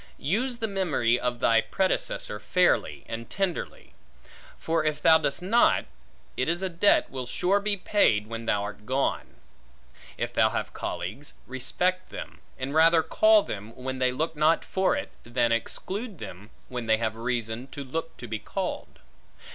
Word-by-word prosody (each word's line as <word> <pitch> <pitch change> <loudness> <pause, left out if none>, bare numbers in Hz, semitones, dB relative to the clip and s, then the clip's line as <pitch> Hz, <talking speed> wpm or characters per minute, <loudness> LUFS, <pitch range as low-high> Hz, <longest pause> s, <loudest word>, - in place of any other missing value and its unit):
Use 235 - -1
the 225 -2 -1
memory 155 - +1
of 125 -1 -2
thy 115 -1 +5
predecessor, 110 - -1
fairly 180 +8 +1
and 115 0 -6
tenderly; 190 0 -3 0.6
for 165 -1 0
if 150 -1 0
thou 160 +1 +6
dost 160 +3 -1
not, 230 +6 +4 0.5
it - - 0
is 175 +3 0
a 190 - 0
debt 175 +4 +3
will 130 -2 -5
sure 190 +10 +2
be 205 0 -1
paid 145 - +2
when 115 +1 -6
thou 100 -2 +1
art 105 +1 -7
gone. 135 +1 -1 0.8
If - - -3
thou - - +4
have - - -3
colleagues, 110 +11 -5
respect 180 +9 -1
them, - - -8 0.2
and 130 +2 -4
rather 160 +1 +5
call 215 +3 +5
them, 105 +2 -7
when 130 0 -5
they 130 -1 +3
look 160 +5 -2
not 155 +2 +3
for 190 0 +1
it, 95 - -4
than 120 0 +1
exclude 195 - -3
them, 100 -3 -9 0.2
when 125 -2 -5
they 110 0 +4
have 110 -1 -2
reason 115 +1 -3
to 140 +1 -7
look 165 +5 -5
to 120 - -8
be 110 -1 -3
called. - - -4
135 Hz, 165 wpm, -27 LUFS, 115-180 Hz, 0.8 s, thou